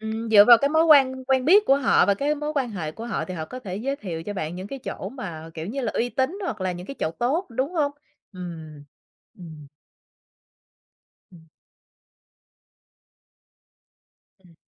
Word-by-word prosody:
Ừm, 220 Hz, +1 st, -4 dB
dựa 205 Hz, -2 st, +8 dB
vào 235 Hz, +1 st, +8 dB
cái 280 Hz, +4 st, +1 dB
mối 320 Hz, +1 st, +3 dB
quan 265 Hz, -4 st, +5 dB
quen 260 Hz, -1 st, +1 dB
biết 390 Hz, +8 st, +6 dB
của 270 Hz, -, +5 dB
họ 275 Hz, -3 st, +3 dB
và 200 Hz, -, +3 dB
cái 285 Hz, +8 st, 0 dB
mối 300 Hz, +1 st, -4 dB
quan 265 Hz, -5 st, -1 dB
hệ 160 Hz, -7 st, -5 dB
của 230 Hz, +5 st, -8 dB
họ 225 Hz, -, -2 dB
thì 185 Hz, -, -7 dB
họ 160 Hz, -3 st, -4 dB
có 250 Hz, +11 st, -9 dB
thể 190 Hz, -6 st, -6 dB
giới 270 Hz, +7 st, -3 dB
thiệu 170 Hz, -9 st, -6 dB
cho 205 Hz, -, -5 dB
bạn 170 Hz, -4 st, -4 dB
những 185 Hz, -, -7 dB
cái 275 Hz, +6 st, -7 dB
chỗ 265 Hz, -, -6 dB
mà, 170 Hz, -, -8 dB
kiểu 160 Hz, 0 st, -6 dB
như 265 Hz, +7 st, -4 dB
là, 230 Hz, -, -2 dB
uy 240 Hz, -, 0 dB
tín, 260 Hz, -, -2 dB
hoặc 220 Hz, -, -4 dB
là 185 Hz, -1 st, -1 dB
những 175 Hz, +1 st, -8 dB
cái 275 Hz, -, -7 dB
chỗ -, -, -1 dB
tốt, 265 Hz, -, -1 dB
đúng 260 Hz, +7 st, -2 dB
hông? 290 Hz, -3 st, +1 dB, 0.4 s
Ừm, 160 Hz, -5 st, -9 dB, 0.5 s
ừm. 160 Hz, -4 st, -11 dB, 1.6 s
Ừm. 175 Hz, -, -16 dB, 3.0 s
Ừm. 180 Hz, -3 st, -22 dB
225 Hz, 190 wpm, -24 LUFS, 180-275 Hz, 3.0 s, dựa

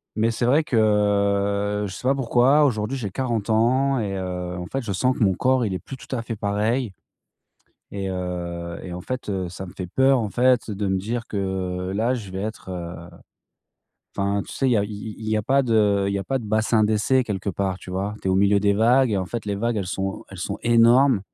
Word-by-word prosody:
Mais 110 Hz, +1 st, +2 dB
c'est 115 Hz, +1 st, -1 dB
vrai 145 Hz, +6 st, +4 dB
que 105 Hz, -2 st, +1 dB
je 95 Hz, -, -8 dB
sais 125 Hz, +6 st, -5 dB
pas 135 Hz, -, +5 dB
pourquoi, 135 Hz, +3 st, +4 dB
aujourd'hui, 115 Hz, 0 st, 0 dB
j'ai 105 Hz, -6 st, -4 dB
40 115 Hz, -1 st, -2 dB
ans 130 Hz, +4 st, +2 dB
et 100 Hz, -3 st, -2 dB
heu, 90 Hz, -1 st, -4 dB
en 90 Hz, 0 st, -5 dB
fait, 135 Hz, -1 st, -3 dB
je 105 Hz, -, -4 dB
sens 125 Hz, +7 st, +1 dB
que -, -, +1 dB
mon 95 Hz, -2 st, +4 dB
corps, 130 Hz, +5 st, +2 dB
il 100 Hz, -, -2 dB
est 95 Hz, -, -3 dB
plus 135 Hz, -, -9 dB
tout 130 Hz, -, -10 dB
à 115 Hz, -, -2 dB
fait 115 Hz, -1 st, -5 dB
pareil, 105 Hz, +3 st, -1 dB, 1.0 s
et 100 Hz, -1 st, -4 dB
heu, 85 Hz, -2 st, -4 dB
et 90 Hz, -1 st, -6 dB
en 90 Hz, -, -6 dB
fait, 130 Hz, -3 st, -5 dB
heu, 95 Hz, -3 st, -2 dB
ça 95 Hz, +1 st, -7 dB
me -, -, -10 dB
fait 90 Hz, -, -4 dB
peur, 130 Hz, +7 st, +3 dB
en 110 Hz, -4 st, -2 dB
fait, 125 Hz, -3 st, +2 dB
de 100 Hz, 0 st, -2 dB
me 95 Hz, -, +1 dB
dire 115 Hz, +4 st, -3 dB
que 95 Hz, -2 st, -3 dB
là, 115 Hz, +5 st, +1 dB
je 105 Hz, -6 st, -6 dB
vais 95 Hz, -, -4 dB
être, 105 Hz, -2 st, -6 dB
heu, 85 Hz, -1 st, -5 dB, 1.2 s
enfin 100 Hz, +1 st, 0 dB
tu -, -, -9 dB
sais, 135 Hz, -, 0 dB
il 125 Hz, -, +3 dB
y -, -, +4 dB
a 100 Hz, -, +1 dB
i 105 Hz, -, -6 dB
i 105 Hz, +1 st, -6 dB
il 110 Hz, -, -6 dB
y 110 Hz, -, +1 dB
a 105 Hz, -, 0 dB
pas 135 Hz, +5 st, +3 dB
de 105 Hz, -5 st, +2 dB
il -, -, -1 dB
y -, -, 0 dB
a 95 Hz, -, -4 dB
pas 135 Hz, -1 st, -1 dB
de 115 Hz, -, -8 dB
bassin 110 Hz, +1 st, +2 dB
d'essai 110 Hz, +5 st, +2 dB
quelque 100 Hz, -3 st, -3 dB
part, 95 Hz, 0 st, -2 dB
tu 90 Hz, -, -11 dB
vois? 100 Hz, +3 st, -2 dB
Tu -, -, -1 dB
es -, -, +2 dB
au -, -, +2 dB
milieu 100 Hz, +1 st, +4 dB
des 100 Hz, 0 st, +2 dB
vagues 120 Hz, +4 st, +4 dB
et 100 Hz, -, +1 dB
en 95 Hz, -, -2 dB
fait, 115 Hz, +3 st, -5 dB
les 100 Hz, -1 st, -2 dB
vagues, 115 Hz, +3 st, -1 dB
elles 100 Hz, -3 st, -2 dB
sont 95 Hz, +1 st, -3 dB
elles -, -, -10 dB
sont -, -, -3 dB
énormes 120 Hz, +1 st, +5 dB
105 Hz, 250 wpm, -23 LUFS, 95-120 Hz, 1.2 s, pas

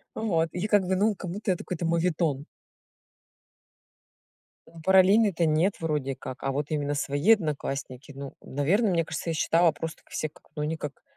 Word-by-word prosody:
Вот, 170 Hz, -7 st, +1 dB
и 180 Hz, +4 st, -2 dB
как 205 Hz, -2 st, +4 dB
бы, 190 Hz, -, +1 dB
ну, 210 Hz, +3 st, +2 dB
как 190 Hz, -2 st, -7 dB
будто 200 Hz, +3 st, -2 dB
это 180 Hz, -, -3 dB
какой-то 175 Hz, -1 st, -3 dB
моветон. 165 Hz, -4 st, 0 dB, 2.4 s
Параллельные 190 Hz, +4 st, +5 dB
то 170 Hz, -1 st, 0 dB
нет, 160 Hz, +5 st, +2 dB
вроде 150 Hz, -4 st, -1 dB
как, 130 Hz, -1 st, -8 dB
а 135 Hz, -, 0 dB
вот 145 Hz, +2 st, -3 dB
именно 145 Hz, -1 st, -1 dB
свои 145 Hz, +9 st, +3 dB
одноклассники 145 Hz, -, -3 dB
Ну, 140 Hz, 0 st, -8 dB
наверное, 175 Hz, -, +1 dB
мне 165 Hz, -2 st, +1 dB
кажется, 160 Hz, +1 st, -4 dB
я -, -, 0 dB
считала 165 Hz, +2 st, +3 dB
просто 160 Hz, +1 st, -6 dB
так -, -, -28 dB
все 155 Hz, -, -2 dB
как, 155 Hz, -, -21 dB
ну, 150 Hz, -, -2 dB
они 155 Hz, +2 st, -1 dB
как 150 Hz, -2 st, -7 dB
165 Hz, 175 wpm, -27 LUFS, 145-185 Hz, 2.4 s, Параллельные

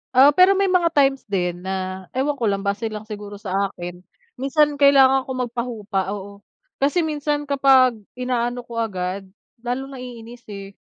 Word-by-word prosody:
Oo, 275 Hz, +3 st, +8 dB
pero 370 Hz, +5 st, +5 dB
may 390 Hz, -1 st, +2 dB
mga 355 Hz, -2 st, +3 dB
times 270 Hz, -3 st, +2 dB
din 180 Hz, -3 st, -1 dB
na, 185 Hz, 0 st, -4 dB
ewan 280 Hz, +1 st, 0 dB
ko 230 Hz, -, +1 dB
lang 200 Hz, 0 st, -1 dB
base 200 Hz, +3 st, -1 dB
lang 215 Hz, 0 st, -6 dB
siguro 205 Hz, -1 st, -8 dB
sa 200 Hz, -1 st, -1 dB
akin, 175 Hz, -1 st, -8 dB, 0.4 s
minsan 290 Hz, +1 st, +2 dB
kailangan 270 Hz, -2 st, +5 dB
ko -, -, -4 dB
magpahupa, 230 Hz, -6 st, -3 dB
oo. 200 Hz, 0 st, -9 dB, 0.4 s
Kasi 290 Hz, +5 st, +2 dB
minsan 295 Hz, -1 st, -1 dB
kapag 270 Hz, -4 st, +4 dB, 0.2 s
inaano 245 Hz, -1 st, -2 dB
ko 235 Hz, -1 st, -6 dB
agad, 190 Hz, -2 st, -3 dB, 0.3 s
lalong 250 Hz, +3 st, -4 dB
naiinis 240 Hz, -1 st, -10 dB
eh. 200 Hz, -1 st, -8 dB
240 Hz, 160 wpm, -22 LUFS, 200-275 Hz, 0.4 s, Oo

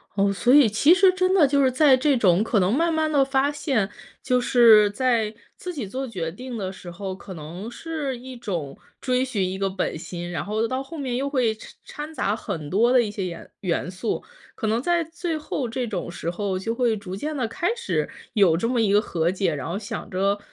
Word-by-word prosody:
哦， 200 Hz, 0 st, +2 dB
所 245 Hz, +6 st, +2 dB
以 285 Hz, -4 st, +8 dB
其 220 Hz, +10 st, +5 dB
实 380 Hz, +1 st, +6 dB
真 370 Hz, 0 st, +1 dB
的 340 Hz, -7 st, +5 dB
就 280 Hz, +1 st, +2 dB
是 260 Hz, -, +3 dB
在 270 Hz, +1 st, +5 dB
这 265 Hz, +1 st, +2 dB
种 190 Hz, -3 st, +4 dB
可 220 Hz, -1 st, +1 dB
能 185 Hz, +2 st, +2 dB
慢 330 Hz, +5 st, +2 dB
慢 315 Hz, 0 st, +1 dB
地 285 Hz, -3 st, +4 dB
发 270 Hz, +1 st, +1 dB
现， 270 Hz, -8 st, -1 dB, 0.3 s
就 250 Hz, -2 st, +1 dB
是 225 Hz, -4 st, +6 dB
在 225 Hz, -1 st, +1 dB, 0.2 s
自 360 Hz, -, -6 dB
己 265 Hz, -, -4 dB
做 260 Hz, +7 st, -4 dB
决 185 Hz, -10 st, -4 dB
定 245 Hz, +7 st, -7 dB
的 190 Hz, -3 st, -3 dB
时 185 Hz, -2 st, -9 dB
候， 190 Hz, +1 st, -5 dB
可 190 Hz, 0 st, -10 dB
能 175 Hz, +7 st, -8 dB
是 295 Hz, -1 st, -4 dB
一 255 Hz, +1 st, -9 dB
种 175 Hz, -, -5 dB, 0.2 s
追 255 Hz, -1 st, +1 dB
寻 205 Hz, -8 st, -1 dB
一 190 Hz, -, -4 dB
个 195 Hz, 0 st, 0 dB
本 190 Hz, -3 st, -2 dB
心， 175 Hz, +2 st, -6 dB
然 175 Hz, -, -3 dB
后 215 Hz, +2 st, -1 dB
到 260 Hz, +3 st, -2 dB
后 310 Hz, +4 st, -9 dB
面 260 Hz, -4 st, -3 dB
又 275 Hz, +3 st, -1 dB
会 250 Hz, -6 st, +1 dB
掺 215 Hz, -, -12 dB
掺 300 Hz, +2 st, -7 dB
杂 210 Hz, -8 st, 0 dB
很 170 Hz, -9 st, -5 dB
多 225 Hz, +7 st, +3 dB
的 255 Hz, -1 st, +6 dB
一 220 Hz, -, -2 dB
些 200 Hz, -2 st, -4 dB
颜 170 Hz, -2 st, -7 dB
元 180 Hz, -1 st, -1 dB
素。 190 Hz, +5 st, -3 dB, 0.3 s
可 220 Hz, -, -3 dB
能 225 Hz, +2 st, +1 dB
在 345 Hz, +4 st, +2 dB
最 330 Hz, 0 st, -4 dB
后 285 Hz, -4 st, -3 dB
这 245 Hz, +1 st, -3 dB
种 185 Hz, -5 st, -4 dB
时 170 Hz, -, -4 dB
候， 190 Hz, +1 st, -2 dB
就 225 Hz, +4 st, -3 dB
会 235 Hz, -3 st, +1 dB
逐 190 Hz, -2 st, -7 dB
渐 300 Hz, +9 st, -4 dB
地 250 Hz, -4 st, 0 dB
开 360 Hz, -, -1 dB
始 475 Hz, 0 st, -2 dB, 0.2 s
有 190 Hz, -7 st, +4 dB
这 205 Hz, -, 0 dB
么 245 Hz, -1 st, +1 dB
一 210 Hz, -3 st, +2 dB
个 205 Hz, +1 st, +5 dB
和 170 Hz, -4 st, 0 dB
解。 185 Hz, -4 st, 0 dB
然 135 Hz, -3 st, -5 dB
后 185 Hz, +4 st, -2 dB
想 210 Hz, -, -6 dB
着， 195 Hz, +2 st, +1 dB
230 Hz, 250 characters per minute, -24 LUFS, 190-270 Hz, 0.3 s, 以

